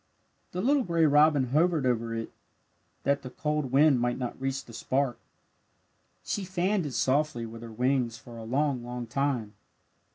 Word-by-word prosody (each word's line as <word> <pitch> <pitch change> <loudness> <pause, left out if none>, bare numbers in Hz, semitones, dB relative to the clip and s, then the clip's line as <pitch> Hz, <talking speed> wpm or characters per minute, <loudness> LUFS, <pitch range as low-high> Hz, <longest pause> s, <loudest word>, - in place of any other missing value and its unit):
The 180 - -3
little 275 +6 +3
gray 170 -7 +2
robin 145 -3 +4
hovered 155 +1 +2
over 115 -2 0
it 115 0 -4 0.7
that 140 +1 +1
the 130 - -7
cold 150 -1 -2
wind 140 -1 +5
might 120 0 0
not 125 0 -5
reach 135 0 -2
the 115 - -13
spark. 130 +2 -1 1.0
She 205 - -2
fanned 185 -1 0
it 135 - -6
softly 135 -3 +1
with 115 0 -9
her 115 -1 -8
wings 125 0 0
for 120 +1 -12
a 115 - -8
long, 130 +2 0
long 120 0 -5
time. 125 -3 -1
135 Hz, 165 wpm, -28 LUFS, 120-150 Hz, 1.0 s, wind